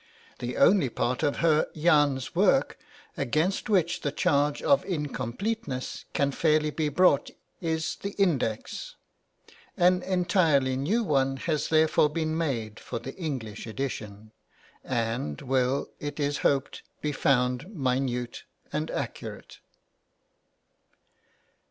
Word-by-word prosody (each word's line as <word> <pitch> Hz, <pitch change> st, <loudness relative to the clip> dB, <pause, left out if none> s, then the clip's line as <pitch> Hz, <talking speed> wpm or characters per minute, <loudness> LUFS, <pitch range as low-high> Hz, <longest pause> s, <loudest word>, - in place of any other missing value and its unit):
The 120 Hz, 0 st, -4 dB
only 150 Hz, -2 st, +5 dB
part 125 Hz, +2 st, -1 dB
of 145 Hz, -, +1 dB
Herr 155 Hz, -2 st, +3 dB
Jahn's 145 Hz, -5 st, +2 dB
work -, -, +2 dB, 0.4 s
against 160 Hz, -, 0 dB
which 180 Hz, -5 st, +2 dB
the 145 Hz, -, -1 dB
charge 145 Hz, -2 st, +1 dB
of 280 Hz, -, +4 dB
incompleteness 150 Hz, -, -3 dB
can 140 Hz, 0 st, +1 dB
fairly 155 Hz, +1 st, +2 dB
be 155 Hz, 0 st, -1 dB
brought 145 Hz, -1 st, +3 dB, 0.3 s
is 160 Hz, -2 st, -1 dB
the 200 Hz, 0 st, -5 dB
Index; 140 Hz, -, -1 dB, 0.8 s
an 180 Hz, +1 st, +4 dB
entirely 170 Hz, -8 st, +2 dB
new 185 Hz, -, +1 dB
one 135 Hz, -6 st, +1 dB
has 155 Hz, +2 st, -1 dB
therefore 155 Hz, -1 st, +4 dB
been 155 Hz, 0 st, -2 dB
made 120 Hz, -10 st, -2 dB
for -, -, -5 dB
the 125 Hz, +4 st, -7 dB
English 125 Hz, -, -5 dB
edition, 110 Hz, -4 st, -5 dB, 0.5 s
and 115 Hz, -, -2 dB
will, 130 Hz, +1 st, 0 dB
it 145 Hz, +1 st, -5 dB
is 145 Hz, -1 st, 0 dB
hoped, 140 Hz, -1 st, 0 dB, 0.2 s
be 150 Hz, -, -1 dB
found 125 Hz, 0 st, +1 dB
minute 125 Hz, -, -2 dB, 0.3 s
and -, -, -1 dB
accurate. -, -, -6 dB
145 Hz, 115 wpm, -27 LUFS, 125-165 Hz, 0.8 s, only